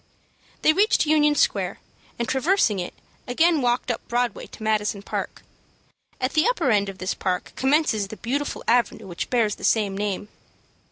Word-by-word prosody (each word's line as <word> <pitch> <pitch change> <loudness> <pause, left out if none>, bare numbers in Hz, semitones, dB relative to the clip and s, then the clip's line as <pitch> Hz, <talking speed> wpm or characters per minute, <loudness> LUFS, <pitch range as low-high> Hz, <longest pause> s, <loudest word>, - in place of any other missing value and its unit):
They 310 - +6
reached 405 +2 +3
Union 300 -1 +3
Square, - - +1 0.4
and, 235 - -2
traversing 265 - +2
it, 175 - -5 0.3
again 320 +5 +3
walked 245 0 +1
up 235 - -4
Broadway 240 0 -1
to 220 - -11
Madison 210 -2 0
Park. - - -5 0.8
At 255 +1 -1
the 310 +5 +3
upper 360 - +1
end 200 -2 +2
of 195 - -8
this 185 0 -2
park 180 -1 -3
commences 265 -7 +2
the 220 - -9
beautiful 280 +5 -3
avenue 230 -2 +2
which 175 -2 -5
bears 230 -4 +2
the - - -11
same 205 -3 +2
name. 205 0 -3
240 Hz, 165 wpm, -24 LUFS, 205-295 Hz, 0.8 s, They